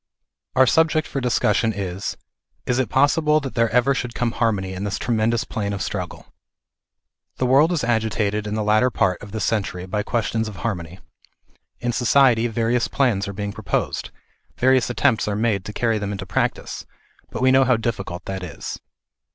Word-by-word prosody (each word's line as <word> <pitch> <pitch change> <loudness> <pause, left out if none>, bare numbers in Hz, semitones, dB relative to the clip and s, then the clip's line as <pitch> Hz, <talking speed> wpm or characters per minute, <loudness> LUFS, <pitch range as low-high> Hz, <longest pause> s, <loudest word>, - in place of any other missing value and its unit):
Our 130 0 +6
subject 155 +3 +2
for 135 - -3
discussion 115 -2 +1
is, 95 -1 -4 0.5
is 125 0 0
it 130 - 0
possible 150 +3 +3
that 135 -3 -6
there 115 -2 +2
ever 125 +4 +3
should 125 -3 -4
come 120 -1 0
harmony 100 -6 0
in 95 +1 -5
this 100 0 -2
tremendous 115 0 0
plane 100 -2 -3
of 100 - -4
struggle? 90 -3 -5 1.1
The 130 - 0
world 140 +6 +5
is 165 -6 0
agitated 110 -2 0
in 105 - -2
the 110 - -1
latter 110 +4 +3
part 95 -6 0
of 105 - -10
this 110 - -2
century 95 -5 -1
by 105 +3 -2
questions 110 +1 -1
of 105 - -7
harmony; 90 -4 -4 0.8
in 120 0 0
society, 120 -1 +4
various 115 +1 0
plans 110 -7 +1
are 100 - -5
being 100 0 -4
proposed, - - -2 0.5
various 130 -1 +3
attempts 115 -2 +1
are 105 - -1
made 105 -3 0
to - - -5
carry 115 0 0
them 100 0 -3
into 95 -1 -5
practice, 95 - -2 0.4
but 115 - -4
we 130 - +5
know 135 0 +6
how 125 -2 +3
difficult 100 -6 -4
that 95 -1 -4
is. 85 -6 -6
110 Hz, 180 wpm, -22 LUFS, 100-125 Hz, 1.1 s, Our